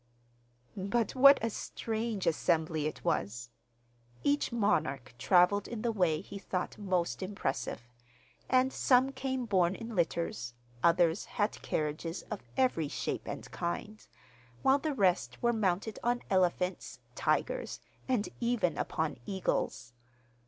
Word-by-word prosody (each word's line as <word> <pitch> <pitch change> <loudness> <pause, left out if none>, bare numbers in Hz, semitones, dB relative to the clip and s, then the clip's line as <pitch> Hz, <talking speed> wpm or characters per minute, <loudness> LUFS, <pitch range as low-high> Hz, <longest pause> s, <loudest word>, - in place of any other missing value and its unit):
But 205 +4 0
what 275 +2 +8
a 230 - 0
strange 220 -1 -3
assembly 160 -2 +1
it 155 - -7
was! 120 +4 -1 0.7
Each 285 -1 +1
monarch 155 - 0
travelled 185 +2 +4
in 235 -2 -5
the 235 - +1
way 180 -7 +1
he 200 - -8
thought 185 0 -3
most 185 -4 -1
impressive; 185 - -3 0.6
and 260 0 +3
some 260 +1 +4
came 260 -1 -2
borne 190 -4 +2
in 225 +1 -7
litters, 165 -8 -1 0.3
others 170 +1 +3
had 210 0 -2
carriages 155 +3 -2
of 210 - -3 0.2
every 250 - +2
shape - - -3
and - - -5
kind, 205 +5 -4 0.6
while 270 +1 +5
the 300 -1 -2
rest 190 -6 +2
were 235 0 +2
mounted 205 0 0
on 245 +1 +1
elephants, 180 0 +1 0.2
tigers, - - -1 0.3
and 245 -5 +1
even 235 -7 +1
upon 160 -4 -1
eagles. 180 - -2
195 Hz, 125 wpm, -31 LUFS, 170-235 Hz, 0.7 s, what